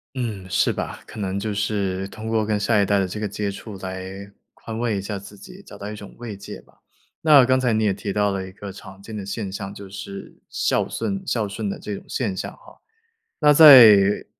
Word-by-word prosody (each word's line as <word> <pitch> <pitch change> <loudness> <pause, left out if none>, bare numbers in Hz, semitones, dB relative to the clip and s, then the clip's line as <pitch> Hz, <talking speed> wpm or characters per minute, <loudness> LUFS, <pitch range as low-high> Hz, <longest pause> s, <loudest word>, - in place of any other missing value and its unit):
嗯， 110 -7 -4
是 - - +2
吧， - - -5
可 - - -11
能 95 0 -2
就 105 0 -3
是 100 -2 -1
通 110 +2 -8
过 110 -1 +1
跟 105 -1 -1
下 105 0 +2
一 - - +3
代 100 +1 +2
的 95 - 0
这 100 - -6
个 105 - -2
接 105 0 -3
触 100 0 -9
来 95 +1 -7 0.2
宽 110 -1 -8
慰 115 -4 -1
一 - - -2
下 100 +1 -5
自 100 +1 -13
己， 185 - -13
找 - - -13
到 100 +1 -6
一 105 - -7
种 105 -1 -11
慰 115 -4 -7
藉 100 - -9
吧。 - - -26 0.5
那 145 -5 +7
刚 130 +1 +3
才 125 -2 +1
你 110 0 +1
也 100 -2 +2
提 100 0 -4
到 105 0 +1
了 95 -1 -3
一 95 - -11
个 100 +1 -9
常 95 0 -12
见 110 +2 -9
的 100 - -5
现 100 0 -4
象， 95 0 -6
就 100 -1 -10
是 100 0 -9
孝 - - +1
巽 195 -1 -3
孝 110 - -1
顺 100 0 -4
的 - - -5
这 105 - -6
种 - - -12
现 105 -8 -2
象 - - -5
哈， - - -19 0.6
那 150 -1 +6
在 115 -10 +8
105 Hz, 255 characters per minute, -22 LUFS, 100-110 Hz, 0.6 s, 在